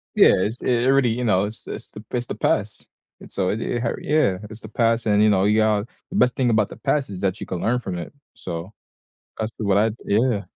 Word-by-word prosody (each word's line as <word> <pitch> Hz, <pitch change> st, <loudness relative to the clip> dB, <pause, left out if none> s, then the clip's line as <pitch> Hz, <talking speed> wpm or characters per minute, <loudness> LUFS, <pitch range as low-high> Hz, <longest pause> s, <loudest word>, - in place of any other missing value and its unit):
Yeah, -, -, +7 dB
it's 110 Hz, +6 st, -2 dB
it 120 Hz, 0 st, +1 dB
really, 135 Hz, -3 st, +4 dB
you 120 Hz, +2 st, -1 dB
know, 100 Hz, -3 st, +2 dB
it's 110 Hz, +2 st, -9 dB
it's -, -, -7 dB
the 105 Hz, -, -10 dB
it's 120 Hz, -1 st, -2 dB
the -, -, -5 dB
past, -, -, -1 dB, 0.3 s
and -, -, -14 dB
so 95 Hz, -2 st, -1 dB
it 110 Hz, -, -2 dB
it 120 Hz, -, -2 dB
har 115 Hz, -, -1 dB
yeah. 145 Hz, -12 st, +2 dB
It's 110 Hz, +1 st, -11 dB
the 110 Hz, -, -9 dB
past 115 Hz, 0 st, +1 dB
and, 105 Hz, -1 st, +3 dB
you 105 Hz, -, +5 dB
know, 95 Hz, -2 st, +3 dB
you 105 Hz, +2 st, +3 dB
got 110 Hz, 0 st, +2 dB, 0.2 s
the -, -, -7 dB
best 125 Hz, 0 st, +3 dB
thing 130 Hz, -2 st, +1 dB
about 110 Hz, -3 st, +2 dB
the -, -, -10 dB
past 140 Hz, -5 st, 0 dB
is 95 Hz, -2 st, -7 dB
that 95 Hz, -2 st, -1 dB
you -, -, -5 dB
can 90 Hz, -, -4 dB
learn 125 Hz, +2 st, +1 dB
from 95 Hz, -6 st, -5 dB
it. 85 Hz, -, -7 dB, 0.2 s
So, 90 Hz, +3 st, -7 dB, 0.6 s
that's 110 Hz, +1 st, -3 dB
to -, -, -7 dB
what 100 Hz, -1 st, +2 dB
I 110 Hz, +2 st, +3 dB
yeah. 105 Hz, -2 st, +1 dB
110 Hz, 255 wpm, -23 LUFS, 100-120 Hz, 0.6 s, Yeah